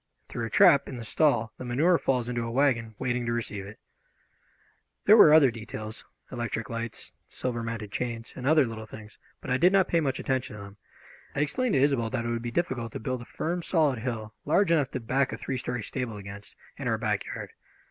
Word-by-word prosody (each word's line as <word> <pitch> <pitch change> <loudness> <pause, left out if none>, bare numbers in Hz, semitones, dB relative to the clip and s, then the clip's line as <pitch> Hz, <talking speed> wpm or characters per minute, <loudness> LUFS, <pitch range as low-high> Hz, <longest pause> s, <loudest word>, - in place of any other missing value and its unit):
Through 115 -1 -3
a - - -8
trap 170 - +5
in 130 - -6
the 115 - -6
stall 115 -3 +1
the - - -5
manure 150 +8 +3
falls 125 -3 0
into 120 -1 -2
a 115 - -3
wagon 120 -3 +1
waiting 125 -1 -1
to - - 0
receive 105 -4 -3
it. 105 - -11 1.3
There 210 - +8
were 155 - +9
other 150 -5 +7
details 110 -1 -7 0.3
electric 115 -3 -3
lights, 115 -1 -5 0.2
silver 120 -2 -3
mounted 115 -3 -5
chains, 115 0 -4
and 130 0 -5
other 155 -2 +5
little 110 -2 -7
things 110 0 -12 0.2
but - - -5
I 130 - +3
did 180 +6 +5
not 195 -1 +4
pay 170 - +2
much 135 -4 -1
attention 130 -3 -2
to 105 - -9
them. 100 0 -12 0.6
I 135 - +1
explained 215 - 0
to - - +3
Isobel 135 -6 +2
that 115 -1 -2
it - - -1
would 115 0 -2
be 120 - -3
difficult 120 -6 -2
to - - -4
build 130 +2 -3
a - - -9
firm, 175 +7 -3
solid 155 -8 +1
hill, 110 -3 -4
large 170 +4 +3
enough 145 -6 +3
to 130 - -4
back 130 +4 0
a - - -4
three 130 - -3
story 125 -2 -3
stable 125 -4 -4
against, 100 +1 -10 0.2
in - - -4
our - - +1
backyard. - - -3
120 Hz, 220 wpm, -27 LUFS, 115-140 Hz, 1.3 s, were